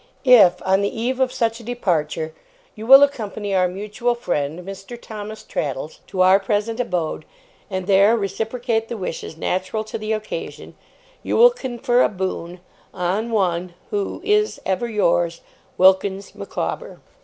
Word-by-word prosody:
If, 210 -9 +6
on 190 +1 +3
the 200 - +1
eve 250 +3 -1
of 260 -1 +2
such 230 -2 -1
a - - -12
departure, 165 -9 -1 0.4
you 220 +1 -9
will 270 +2 +10
accompany 215 -7 -2
our 185 -1 +3
mutual 210 +6 -2
friend, 155 -8 -2
Mr. 195 +5 -8
Thomas 215 -1 -8
Traddles, 145 +1 -4
to 185 - -2
our 185 +1 +6
present 210 +3 -1
abode, 175 -10 -2 0.5
and 185 -2 -3
there 200 +4 +5
reciprocate 225 +3 -2
the 235 - -5
wishes 165 -4 -5
natural 185 +5 -2
to 215 - -6
the 215 +1 -4
occasion, 215 0 -6 0.5
you - - -1
will 485 +1 +8
confer 250 - 0
a - - +4
Boon 185 -2 -4 0.3
'On 190 +6 -1
'One 180 -5 -1 0.2
'Who 410 -1 -2
'Is 420 +1 +1
'Ever 190 +5 -1
yours, 175 -5 +1 0.4
'WILKINS 190 +1 +3
MICAWBER. - - -5
205 Hz, 150 wpm, -21 LUFS, 185-235 Hz, 0.5 s, will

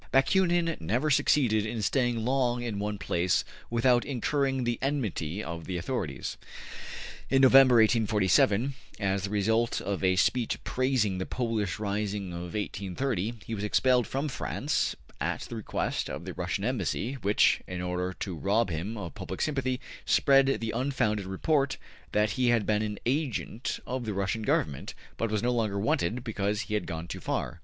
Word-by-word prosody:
Bakunin 170 +3 +3
never 120 - 0
succeeded 130 -6 +3
in 110 0 -3
staying 120 -2 +1
long 125 -2 +1
in 110 -4 -3
one 105 0 -2
place 90 -1 +1 0.2
without 120 +1 +3
incurring 135 0 0
the 120 -1 -1
enmity 110 - -2
of 85 -1 -6
the 90 -2 -3
authorities. 85 - -3 0.9
In 135 0 +4
November, 130 -1 +8
1847, 110 +1 +3 0.3
as 100 -1 0
the - - -5
result 110 +3 +1
of 100 0 -3
a 95 0 +4
speech 115 +5 +1
praising 125 -7 +1
the 95 - -3
Polish 115 -6 -1
rising 100 -2 -2
of 85 +3 -6
1830, 105 +2 -2
he 115 - -5
was 105 -2 -3
expelled 125 +3 +3
from 135 +3 -2
France 135 - -1 0.2
at - - -1
the - - -7
request - - -2
of - - -6
the - - -5
Russian - - -2
Embassy, 125 - -1
which, 100 +1 +3
in 90 -1 -5
order 90 +1 -2
to 95 -4 -3
rob 100 +5 +1
him 90 +8 -3
of 90 -5 -6
public 95 -2 -6
sympathy, 130 -4 0 0.2
spread 135 -1 +4
the 115 -4 0
unfounded 110 -6 0
report 135 +8 +1 0.3
that 105 +1 +2
he 125 -1 +1
had 120 -3 +3
been 105 -1 +2
an 105 -1 -3
agent 130 -2 -1
of 125 -1 -3
the 105 -3 -3
Russian 100 +3 -1
Government, 75 -9 -1 0.2
but 115 - -1
was 105 0 -1
no 125 - +2
longer 110 -4 0
wanted 105 +2 0
because 105 -3 -1
he 105 +2 -5
had 105 - -1
gone 80 -1 -5
too - - -6
far. - - -3
110 Hz, 165 wpm, -29 LUFS, 100-130 Hz, 0.9 s, November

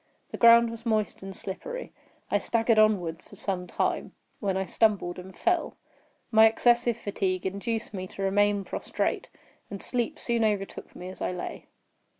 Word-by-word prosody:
The - - -5
ground 235 0 +7
was 230 0 -9
moist 220 -3 0
and 195 0 -7
slippery. - - -6 0.4
I - - +3
staggered 225 -1 +2
onward 185 -6 +2
for - - -16
some 180 -2 -3
time, - - -1 0.3
when 195 -3 0
I 190 - -1
stumbled 190 -3 +1
and 185 0 -11
fell. 350 -1 0 0.5
My 220 0 +8
excessive 240 +1 +3
fatigue 190 -4 -2
induced 220 +4 -3
me 185 -1 -4
to 195 - -6
remain 205 +1 +2
prostrate; - - -2 0.4
and 200 - -6
sleep 240 +1 -2
soon 235 -1 0
overtook 205 -3 -2
me 180 +1 -7
as 185 - -11
I - - -1
lay. 180 - -6
205 Hz, 160 wpm, -27 LUFS, 190-230 Hz, 0.5 s, My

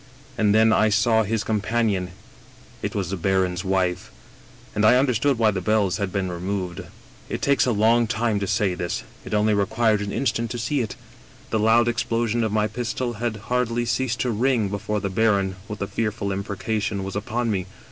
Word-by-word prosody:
And 105 -4 +2
then 110 0 +5
I 110 - +4
saw 110 +2 +3
his 110 0 -1
companion 105 -3 0 0.4
— - - -24
it - - -3
was 95 -3 -2
the - - -1
baron's 95 0 0
wife. 95 -2 0 0.6
And 105 - 0
I 115 +4 +6
under 130 -1 +2
stood 130 +4 +1
why 110 -2 +3
the 95 -2 -3
bells 105 -2 +1
had 100 -3 -2
been 95 -2 -2
removed. 90 0 -3 0.3
" - - -25
It - - -3
takes 140 -2 +2
a - - +3
long 115 +2 +3
time 110 0 0
to 100 - -2
say 100 -1 +1
this; 85 -1 -3 0.2
it - - -3
only 105 +1 +3
required 105 +1 +2
an 100 -1 -3
instant 115 -2 -1
to 120 - -4
see 125 +4 0
it. 110 - -4 0.6
The 110 - +1
loud 115 +2 +4
explosion 120 -1 0
of 110 - 0
my 105 0 +2
pistol 120 +3 -3
had 120 -2 -1 0.2
hardly 120 -1 +1
ceased 120 0 -1
to 125 - 0
ring 115 -2 +1
before 105 +1 -2
the 100 -1 -2
baron, 100 -2 +2
with 105 -2 -5
a - - -3
fearful 105 0 -2
im 95 +1 -2
precation, 100 0 -2
was 95 +1 -5
upon 115 +3 -1
me. 95 -2 -2
110 Hz, 205 wpm, -23 LUFS, 100-115 Hz, 0.6 s, I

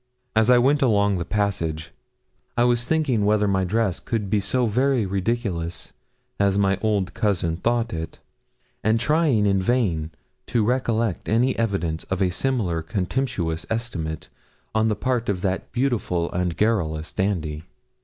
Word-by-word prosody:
As 110 +2 +4
I 125 - +7
went 140 +4 +3
along 100 -6 +3
the 85 - -3
passage, 85 -6 -1 0.7
I 120 - +4
was 120 -1 +2
thinking 145 -9 +1
whether 105 0 +3
my 95 -1 +1
dress 100 -1 0
could 105 -4 -3
be 105 - +3
so 125 +5 0
very 125 +1 +2
ridiculous 95 - -2 0.5
as 100 -1 +3
my 100 -1 +2
old 100 -4 0
cousin 95 -7 0
thought 115 +2 0
it, 80 0 -5 0.7
and 110 +2 +3
trying 150 -5 +2
in 100 -1 +2
vain 95 -8 0 0.4
to 115 -3 +1
recollect 115 -4 0
any 125 +4 +2
evidence 95 -8 -1
of 95 - -3
a 95 -2 +2
similar 100 -7 0
contemptuous 90 - -2
estimate 90 -9 -3 0.5
on 110 0 +2
the 105 - +1
part 120 +1 -1
of 95 -3 -1
that 95 -1 -2
beautiful 115 -9 0
and 90 -1 -1
garrulous 80 -8 0
dandy. 80 -5 -2
105 Hz, 150 wpm, -23 LUFS, 90-115 Hz, 0.7 s, I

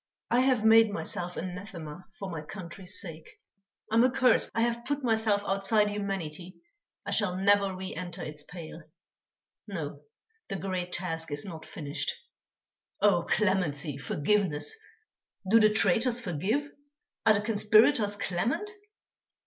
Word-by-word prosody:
I 240 - +4
have 255 -4 +3
made 225 0 +7
myself 175 0 -4
anathema 180 -3 -7
for 195 -1 -5
my 165 -2 -4
country's 185 +4 -7
sake. 165 -4 -10 0.5
I - - -4
am 230 +1 +6
accursed. 255 0 +3
I 230 - +2
have 235 0 0
put 285 +2 -2
myself 220 -3 +2
outside 205 +2 +2
humanity; 185 -4 -4 0.5
I - - -3
shall 205 -4 +1
never 200 0 +3
re 185 0 -6
enter 175 +1 -6
its 150 -1 -5
pale. 165 0 -9 0.9
No, - - -5 0.5
the - - -4
great 185 -2 -3
task 165 -2 -3
is 145 0 -3
not 165 -5 -8
finished. 145 -1 -3 0.9
Oh! 195 -4 +3
clemency, 160 -8 0
forgiveness! 155 - 0 0.7
Do 225 +4 +6
the 215 -1 +6
traitors 225 +4 +3
forgive? 220 - -1 0.6
Are 215 - +7
the 200 - +1
conspirators 215 +1 +4
clement? 205 - -1
195 Hz, 135 wpm, -29 LUFS, 170-220 Hz, 0.9 s, made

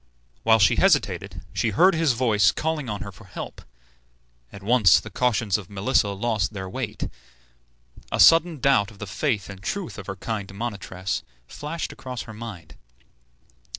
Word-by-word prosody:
While 110 0 +5
she 95 -5 +4
hesitated - - +1
she 115 - +1
heard 180 - +5
his 160 -5 +2
voice 110 -5 +3
calling 155 -5 -2
on 105 -1 -4
her 100 - -6
for 90 - -16
help. - - -8 0.9
At 100 - -11
once 110 -4 +5
the 110 - -10
cautions 110 -2 +1
of 95 - -11
Melissa 100 +2 +1
lost 110 -1 -1
their 95 -2 -5
weight. 95 - -4 1.0
A - - -1
sudden 165 -1 +6
doubt 125 -7 +3
of 110 - -15
the 105 - -6
faith 105 +1 -1
and 95 -1 -10
truth 185 - -4
of 100 - -9
her 95 - -4
kind 105 -2 -4
monitress 100 -4 -4 0.3
flashed 155 - -5
across 125 -2 -6
her 110 - -10
mind. 105 -7 -9
110 Hz, 160 wpm, -24 LUFS, 100-125 Hz, 1.0 s, sudden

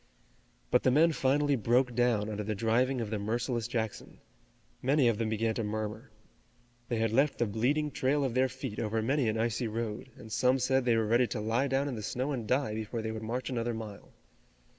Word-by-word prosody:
But 125 - +4
the - - +3
men 155 +6 +5
finally 145 0 +2
broke 125 +2 +2
down 120 -3 +2
under 105 -1 -3
the 105 +1 -2
driving 120 +4 +1
of 110 -2 -4
the 110 - -1
merciless 115 +2 -1
Jackson. 110 -3 -4 0.6
Many 135 0 +3
of 115 -2 +1
them 115 -1 0
began 110 +1 0
to 115 - -2
murmur. 110 +3 -4 0.8
They 120 - 0
had 110 -1 +1
left 135 +5 +2
the 120 - +2
bleeding 135 +8 0
trail 140 +2 +1
of 130 -3 -1
their 130 +1 +2
feet 130 -4 -6
over 110 0 -1
many 135 +1 +1
an 110 - -1
icy 115 +1 0
road, 110 +2 -4
and 110 - -11
some 125 +4 +3
said 130 0 +1
they 120 -2 +3
were 110 - +2
ready 120 +3 +3
to 115 - -4
lie 115 +6 +1
down 135 +1 0
in 140 - -3
the 110 - -5
snow 130 +7 -2
and 120 -6 -3
die 130 -2 +1
before 110 +1 -4
they 110 - -2
would 110 0 -5
march 120 +4 -3
another 120 -1 -1
mile. 110 -3 -8
120 Hz, 215 wpm, -30 LUFS, 110-130 Hz, 0.8 s, men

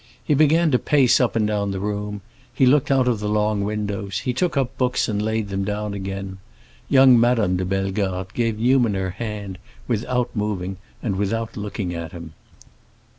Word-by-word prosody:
He 150 - +2
began 155 +3 +4
to 125 - +3
pace 140 -5 +3
up 125 - +1
and 110 -2 +2
down 105 -1 -1
the 95 -1 -3
room, 105 0 -3 0.3
he 130 +2 +2
looked 140 +2 +3
out 135 -2 +3
of 120 -4 +1
the 105 0 -2
long 105 -1 +1
windows, 105 -1 -3
he 125 - -1
took 160 +4 0
up 135 -1 0
books 125 -1 0
and 105 -3 -1
laid 110 -1 -1
them 95 0 -2
down 105 +1 -3
again. 95 -1 -5 0.5
Young 130 -3 +7
Madame 115 -6 +2
de 90 0 -1
Bellegarde 95 -1 -2
gave 115 -3 0
Newman 120 -2 +3
her 95 -1 -2
hand 105 -3 -6 0.3
without 125 +2 -1
moving 95 -3 -2 0.3
and 100 -5 -1
without 110 +3 -2
looking 100 -3 -4
at 85 0 -6
him. 85 -2 -9
105 Hz, 180 wpm, -22 LUFS, 100-125 Hz, 0.5 s, Young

